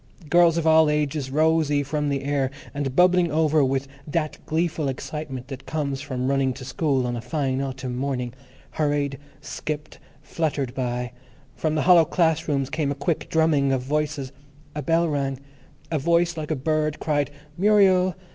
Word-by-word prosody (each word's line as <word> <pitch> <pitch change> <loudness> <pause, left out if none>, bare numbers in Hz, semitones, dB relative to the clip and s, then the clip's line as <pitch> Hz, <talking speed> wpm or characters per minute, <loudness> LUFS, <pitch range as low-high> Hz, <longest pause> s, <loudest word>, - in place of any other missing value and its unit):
Girls 170 -1 +5
of 165 - -1
all 160 -1 +6
ages, 150 -2 -1
rosy 155 0 +2
from 150 +1 -1
the 140 -1 -1
air, 140 -2 0 0.2
and 140 -2 -3
bubbling 180 0 +4
over 155 -1 +3
with 135 +1 0 0.2
that 155 0 -2
gleeful 160 -1 0
excitement 135 -1 -5
that 135 -1 -8
comes 140 -4 -2
from 130 -3 -3
running 135 -1 +1
to 130 0 -9
school 135 -1 0
on 120 0 -2
a 120 - -4
fine 135 +1 -1
autumn 130 -2 -4
morning, 125 -2 -2 0.4
hurried, 145 -3 -1 0.2
skipped, 150 -1 -6 0.2
fluttered 145 -6 -2
by; 125 -1 -2 0.4
from 155 +4 -1
the 150 - +1
hollow 175 -2 +7
class 160 0 +1
rooms 140 -3 -1
came 155 -2 0
a - - -2
quick 160 +3 -2
drumming 155 -4 +3
of 130 -2 0
voices; 145 -1 -2 0.4
a 150 - -3
bell 165 +4 +2
rang; 135 -3 -1 0.5
a 155 - +1
voice 170 +3 +2
like 155 -2 -5
a 155 - +1
bird 155 +2 -1
cried, 145 -2 0 0.3
"Muriel." 190 -2 +4
145 Hz, 165 wpm, -24 LUFS, 135-160 Hz, 0.5 s, hollow